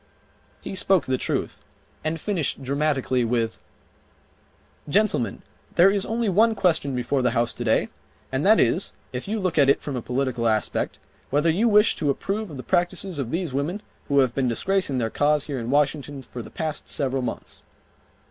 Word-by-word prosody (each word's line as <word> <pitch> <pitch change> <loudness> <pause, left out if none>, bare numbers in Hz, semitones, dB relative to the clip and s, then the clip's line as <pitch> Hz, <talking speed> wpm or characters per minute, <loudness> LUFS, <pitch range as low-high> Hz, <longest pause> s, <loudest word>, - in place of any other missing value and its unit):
He - - -5
spoke 190 -1 +3
the 130 - 0
truth, - - -2 0.4
and 155 +1 -1
finished 160 -8 -2
dramatically 135 -2 0
with: 115 -1 -1 1.3
"Gentlemen, 185 - +1 0.3
there 185 +3 +6
is 200 -1 +1
only 230 0 -1
one 220 +4 +4
question 160 -8 +1
before 125 +2 0
the 125 - +3
House 120 0 +1
today 120 -2 +1 0.4
and - - -1
that - - +6
is, - - +1 0.2
if 125 +6 -5
you 215 +2 -1
look 185 -5 0
at 140 -1 +5
it 140 - +4
from 145 - -5
a 125 - -2
political 125 -1 -1
aspect, 110 -2 -1 0.3
whether 150 +4 +2
you 215 +8 +2
wish 210 0 +5
to 150 - 0
approve 200 +9 -2
of 145 - -8
the 130 - -7
practices 175 -1 0
of 130 -4 -2
these 165 -1 -2
women 145 +9 -1 0.3
who 140 - +1
have 130 -3 +1
been 135 -1 0
disgracing 165 - 0
their 115 -3 -1
cause 150 0 +2
here 140 -4 -4
in 115 0 -5
Washington 145 -1 0
for 125 - -8
the - - -10
past 155 -2 -5
several 135 -2 -1
months." 125 - -5
145 Hz, 180 wpm, -24 LUFS, 130-185 Hz, 1.3 s, there